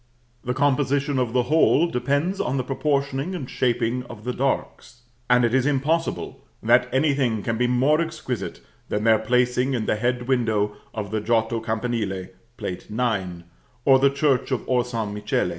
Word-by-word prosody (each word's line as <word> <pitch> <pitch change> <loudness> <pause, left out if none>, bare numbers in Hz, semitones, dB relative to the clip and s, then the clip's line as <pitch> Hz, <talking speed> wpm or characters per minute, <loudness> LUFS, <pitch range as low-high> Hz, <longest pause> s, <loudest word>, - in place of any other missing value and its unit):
The 125 +1 -2
composition 140 0 +1
of 125 -3 0
the 125 0 +2
whole 155 +3 +4
depends 145 +5 0
on 130 +2 -1
the 130 - 0
proportioning 140 +4 -1
and 135 -8 -5
shaping 120 -1 0
of 120 -3 -11
the 125 +1 -2
darks; 130 -2 -3 0.3
and 125 0 +5
it 120 - 0
is 130 +1 +3
impossible 150 +4 -1 0.2
that 120 +3 +4
anything 130 -6 +1
can 115 - -1
be 125 +2 +1
more 135 +6 +3
exquisite 130 - -4 0.3
than 105 - -1
their 110 -1 +5
placing 125 +3 +1
in 110 -3 -2
the - - 0
head 120 +2 -1
window 110 -5 +1 0.2
of 105 -2 -5
the 110 -1 -1
Giotto 115 +1 +1
campanile, 110 -4 -2 0.3
Plate 100 -6 -5
IX., 100 -7 -2 0.4
or 135 -1 +6
the 140 +1 +5
church 140 -2 +1
of 130 -5 -1
Or 125 -1 +2
San 115 -4 -4
Michele. 105 -3 -1
125 Hz, 170 wpm, -23 LUFS, 115-135 Hz, 0.4 s, or